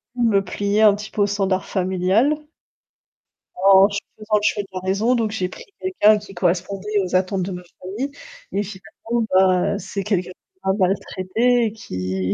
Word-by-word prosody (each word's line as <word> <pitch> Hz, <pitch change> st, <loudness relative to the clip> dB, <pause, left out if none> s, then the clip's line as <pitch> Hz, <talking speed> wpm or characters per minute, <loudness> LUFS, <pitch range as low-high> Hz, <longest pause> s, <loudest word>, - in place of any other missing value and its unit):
dû 245 Hz, -, 0 dB
me 200 Hz, -2 st, +3 dB
plier 200 Hz, +3 st, 0 dB
un 210 Hz, -2 st, +7 dB
petit 210 Hz, +1 st, -8 dB
peu 210 Hz, -, -1 dB
au 200 Hz, -, +4 dB
standard 195 Hz, -2 st, 0 dB
familial 190 Hz, +9 st, +1 dB, 1.3 s
en 195 Hz, 0 st, +7 dB
ch 200 Hz, 0 st, -2 dB, 0.2 s
faisant 215 Hz, 0 st, -1 dB
le -, -, -1 dB
choix 205 Hz, -1 st, +1 dB
de -, -, -14 dB
la 185 Hz, -, -3 dB
raison 200 Hz, +7 st, +1 dB
donc 225 Hz, -3 st, 0 dB
j'ai 185 Hz, -4 st, -2 dB
pris -, -, -11 dB, 0.2 s
quelqu'un 215 Hz, -, +4 dB
qui 205 Hz, -1 st, -12 dB
correspondait 190 Hz, +3 st, -1 dB
aux 185 Hz, 0 st, -3 dB
attentes 185 Hz, 0 st, +1 dB
de 190 Hz, -, -4 dB
ma 180 Hz, -, -6 dB, 0.2 s
famille 215 Hz, +10 st, -4 dB, 0.4 s
et 205 Hz, -, 0 dB
finalement 220 Hz, +4 st, -4 dB
bah, 185 Hz, -1 st, +3 dB
c'est 195 Hz, +1 st, -5 dB
quelqu'un 185 Hz, -3 st, -1 dB
qui 185 Hz, -, -22 dB
m'a 190 Hz, -, +3 dB
maltraité 200 Hz, +5 st, +1 dB
et 215 Hz, -, -1 dB
qui 95 Hz, -, -3 dB
195 Hz, 185 wpm, -21 LUFS, 185-215 Hz, 1.3 s, un